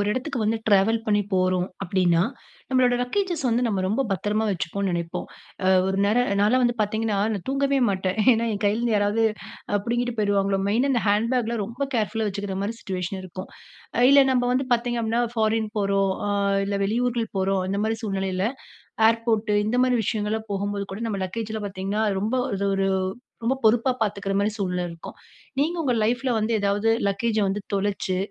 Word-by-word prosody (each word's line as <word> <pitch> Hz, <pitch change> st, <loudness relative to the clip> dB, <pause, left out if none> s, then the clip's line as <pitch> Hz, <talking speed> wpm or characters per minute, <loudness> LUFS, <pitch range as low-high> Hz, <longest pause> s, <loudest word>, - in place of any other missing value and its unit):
ஒரு 205 Hz, -, 0 dB
இடத்துக்கு 255 Hz, +2 st, -3 dB
வந்து 215 Hz, +1 st, +1 dB
ட்ராவல் 205 Hz, +3 st, +4 dB
பண்ணி 205 Hz, -1 st, +3 dB
போறோம் 185 Hz, -1 st, +2 dB, 0.2 s
அப்டின்னா, 175 Hz, -3 st, +2 dB, 0.5 s
நம்மளோட 255 Hz, -2 st, +3 dB
லக்கேஜஸ் 345 Hz, +4 st, -1 dB
வந்து 235 Hz, +1 st, +1 dB
நம்ம 200 Hz, -4 st, 0 dB
ரொம்ப 215 Hz, +8 st, +1 dB
பத்திரமா 210 Hz, +3 st, 0 dB
வச்சுப்போம்னு 190 Hz, +2 st, -2 dB
நினைப்போம். 170 Hz, -1 st, -3 dB, 0.4 s
அ -, -, +2 dB, 0.2 s
ஒரு 190 Hz, 0 st, 0 dB
நேரம் 240 Hz, +5 st, +2 dB
நான் -, -, +2 dB
எல்லாம் 255 Hz, +3 st, +3 dB
வந்து 240 Hz, 0 st, +1 dB
பார்த்தீங்கன்னா 215 Hz, 0 st, 0 dB, 0.2 s
நான் 195 Hz, -, -5 dB
தூங்கவே 275 Hz, 0 st, +1 dB
மாட்டேன். 190 Hz, +1 st, -2 dB
ஏன்னா, 230 Hz, 0 st, +1 dB
என் 200 Hz, -, -4 dB
கைல 205 Hz, +2 st, +2 dB
இருந்து 235 Hz, -2 st, +1 dB
யாராவது 205 Hz, +2 st, +2 dB, 0.6 s
புடுங்கிட்டு 240 Hz, +1 st, -1 dB
போயிருவாங்களோ 200 Hz, -2 st, +1 dB
மெயின்னா, 245 Hz, +7 st, +2 dB
இந்த 235 Hz, -, +1 dB
ஹேண்ட் 210 Hz, +3 st, +2 dB
பேக்லாம் 235 Hz, -3 st, 0 dB
ரொம்ப 250 Hz, +6 st, -3 dB
கேர்ஃபுல்லா 220 Hz, 0 st, 0 dB
வச்சுக்கிற 200 Hz, 0 st, -4 dB
மாரி 220 Hz, +3 st, -3 dB
சிட்யுவேஷன் 185 Hz, 0 st, -4 dB
இருக்கும். 185 Hz, +1 st, -8 dB, 0.6 s
இல்ல 280 Hz, 0 st, +8 dB
நம்ம 250 Hz, -, +2 dB
வந்து 260 Hz, +1 st, 0 dB
பார்த்தீங்க 240 Hz, 0 st, -1 dB
அப்டின்னா, 230 Hz, +2 st, +1 dB
ஃபாரின் 220 Hz, -1 st, +1 dB
போறோம், 195 Hz, -1 st, +1 dB, 0.5 s
இல்ல 200 Hz, -, -2 dB
வெளியூருக்கு 235 Hz, +2 st, -1 dB
போறோம். 190 Hz, 0 st, +1 dB
அந்த 200 Hz, +1 st, -1 dB
மாரி 225 Hz, +1 st, -1 dB
சூழ்நிலையில 190 Hz, -2 st, -1 dB, 0.7 s
ஏர்போர்ட் 230 Hz, -2 st, 0 dB
இந்த 230 Hz, +3 st, 0 dB
மாரி 255 Hz, -1 st, +2 dB
விஷயங்கள்லாம் 215 Hz, +1 st, -2 dB
போகும்போது 200 Hz, 0 st, -2 dB
கூட 195 Hz, -, -6 dB
நம்ம 205 Hz, -3 st, -2 dB
லக்கேஜில 220 Hz, +3 st, -4 dB
பார்த்தீங்கன்னா 195 Hz, +2 st, -2 dB, 0.2 s
ரொம்ப 220 Hz, +5 st, 0 dB, 0.2 s
அது 200 Hz, 0 st, -2 dB
ஒரு 195 Hz, 0 st, +1 dB, 0.6 s
ரொம்ப 250 Hz, +4 st, +1 dB
பொறுப்பா 230 Hz, +4 st, +4 dB
பார்த்துக்கிற 200 Hz, -2 st, -1 dB
மாரி 205 Hz, +2 st, +1 dB
சூழ்நிலை 180 Hz, -3 st, -1 dB
இருக்கும். 165 Hz, -1 st, -10 dB, 0.4 s
நீங்க 320 Hz, +5 st, +1 dB
உங்க 265 Hz, -6 st, +1 dB
லைஃப்பில 245 Hz, +4 st, 0 dB
வந்து 220 Hz, +1 st, 0 dB
ஏதாவது 200 Hz, +2 st, +1 dB, 0.2 s
லக்கேஜ 215 Hz, +3 st, 0 dB
வந்து 200 Hz, +2 st, -2 dB
தொலைச்சு, 195 Hz, -2 st, -1 dB
215 Hz, 170 wpm, -24 LUFS, 195-235 Hz, 0.7 s, இல்ல